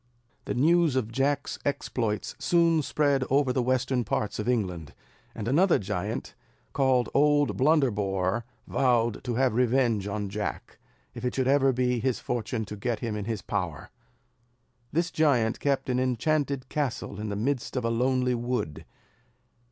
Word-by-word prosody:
The -, -, -3 dB
news 160 Hz, +2 st, +3 dB
of 115 Hz, -4 st, -1 dB
Jack's 140 Hz, +3 st, -1 dB
exploits 115 Hz, -6 st, -2 dB
soon 170 Hz, -2 st, +3 dB
spread 140 Hz, -2 st, +1 dB
over 135 Hz, -1 st, +2 dB
the 130 Hz, -, +1 dB
western 130 Hz, 0 st, +1 dB
parts 105 Hz, 0 st, -2 dB
of 105 Hz, +3 st, -1 dB
England; 90 Hz, -, -2 dB, 0.4 s
and 110 Hz, -1 st, -5 dB
another 170 Hz, +9 st, +4 dB
giant, 105 Hz, +2 st, -4 dB, 0.4 s
called 130 Hz, -3 st, +2 dB
Old 145 Hz, 0 st, +3 dB
Blunderbore, 115 Hz, -, +1 dB, 0.2 s
vowed 120 Hz, -4 st, +1 dB
to 120 Hz, -2 st, -2 dB
have 130 Hz, -1 st, +2 dB
revenge 120 Hz, -4 st, +2 dB
on 105 Hz, 0 st, -3 dB
Jack, 105 Hz, +2 st, -5 dB, 0.3 s
if 120 Hz, -, -8 dB
it 125 Hz, -, -1 dB
should 130 Hz, -1 st, +1 dB
ever 135 Hz, 0 st, +4 dB
be 125 Hz, -1 st, 0 dB
his 125 Hz, +1 st, 0 dB
fortune 115 Hz, -1 st, -3 dB
to 105 Hz, -, -7 dB
get 115 Hz, +3 st, -3 dB
him 115 Hz, -3 st, -2 dB
into 105 Hz, +1 st, -4 dB
his 110 Hz, -4 st, -3 dB
power. 90 Hz, -8 st, -4 dB, 1.0 s
This 170 Hz, +3 st, 0 dB
giant 125 Hz, -8 st, +2 dB
kept 140 Hz, -2 st, 0 dB
an 125 Hz, -1 st, +1 dB
enchanted 135 Hz, +2 st, 0 dB
castle 130 Hz, -8 st, -3 dB
in 105 Hz, 0 st, -4 dB
the 100 Hz, -, -3 dB
midst 125 Hz, +6 st, -2 dB
of 125 Hz, -2 st, -1 dB
a 115 Hz, -, +1 dB
lonely 125 Hz, +1 st, +1 dB
wood. 120 Hz, -10 st, -3 dB
125 Hz, 155 wpm, -27 LUFS, 110-135 Hz, 1.0 s, another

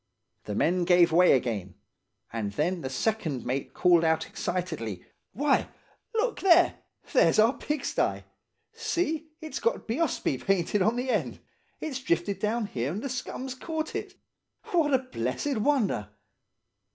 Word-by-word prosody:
The 105 Hz, -, -4 dB
men 175 Hz, -, +2 dB
gave 175 Hz, -1 st, +5 dB
way 180 Hz, +3 st, +6 dB
again; 110 Hz, -8 st, -1 dB, 0.6 s
and 105 Hz, -3 st, -3 dB
then 170 Hz, -, 0 dB
the 130 Hz, -, -4 dB
second 155 Hz, -, -1 dB
mate 130 Hz, +2 st, -3 dB
called 175 Hz, -2 st, +5 dB
out 160 Hz, -1 st, +2 dB
excitedly, 150 Hz, -, -4 dB, 0.3 s
'Why, 280 Hz, +7 st, +1 dB, 0.5 s
look 460 Hz, +1 st, 0 dB
there, 350 Hz, -2 st, +5 dB, 0.3 s
there's -, -, +5 dB
our 220 Hz, +4 st, +5 dB
pigsty! 300 Hz, 0 st, -1 dB, 0.5 s
See, 345 Hz, -9 st, -2 dB
it's 315 Hz, -1 st, -5 dB
got 470 Hz, +1 st, -1 dB
Bheospsé 240 Hz, -, -1 dB
painted 195 Hz, +1 st, +1 dB
on 220 Hz, +5 st, +3 dB
the 250 Hz, +1 st, -1 dB
end. -, -, -1 dB, 0.4 s
It's 280 Hz, -5 st, -4 dB
drifted 180 Hz, -3 st, 0 dB
down 215 Hz, +2 st, 0 dB
here 130 Hz, -7 st, -3 dB
and 200 Hz, +6 st, -4 dB
the 275 Hz, -, -3 dB
scum's 255 Hz, +1 st, -4 dB
caught 315 Hz, +5 st, -4 dB
it. 415 Hz, -2 st, -5 dB, 0.6 s
What 325 Hz, -5 st, +3 dB
a 265 Hz, -, +6 dB
blessed 255 Hz, -, -3 dB
wonder! 215 Hz, -, +1 dB
210 Hz, 140 wpm, -28 LUFS, -, 0.6 s, way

